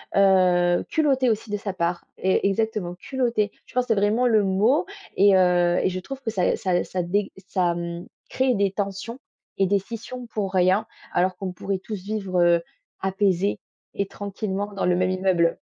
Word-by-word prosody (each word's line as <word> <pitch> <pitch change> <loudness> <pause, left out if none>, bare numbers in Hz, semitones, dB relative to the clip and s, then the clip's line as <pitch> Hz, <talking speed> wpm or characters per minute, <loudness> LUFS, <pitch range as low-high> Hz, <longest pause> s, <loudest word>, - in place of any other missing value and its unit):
heu, 180 -3 +4
culotté 270 -6 +2
aussi 220 0 -3
de 205 - -1
sa 200 -1 -4
part, 170 -1 -2
è 190 0 +2
exactement, 210 -3 -1
culotté. 230 +1 -1
Je - - -19
pense 250 0 +1
que 230 - +3
vraiment 215 +4 +2
le 220 -3 +4
mot 205 - +2 0.3
et 200 +1 +6
et 195 - +6
heu 180 -1 +3
et - - +2
je 185 - -3
trouve 270 +8 -8
que 235 - -3
ça 190 -5 +1
ça 180 -2 0
ça 185 - -3
dég 195 +4 -1 0.2
ça, 180 -2 +1
mmh, 170 0 -5 0.2
crée 260 -1 +1
des 200 -2 +1
tensions 200 +4 -4 0.4
et 195 - +3
des 200 +1 +2
scissions 235 +4 -8
pour 200 -4 -3
rien 185 +4 +3 0.3
alors 185 +1 +1
qu'on 190 -2 -4
pourrait 190 +2 -3
tous 195 -1 -7
vivre, 195 -3 -2
heu, 175 -1 +4 0.4
apaisés 195 0 +1 0.4
et 200 - 0
tranquillement 200 0 -4
dans 195 - -2
le 180 0 +3
même 185 +1 +1
immeuble. 185 -3 +2
195 Hz, 185 wpm, -24 LUFS, 180-215 Hz, 0.4 s, et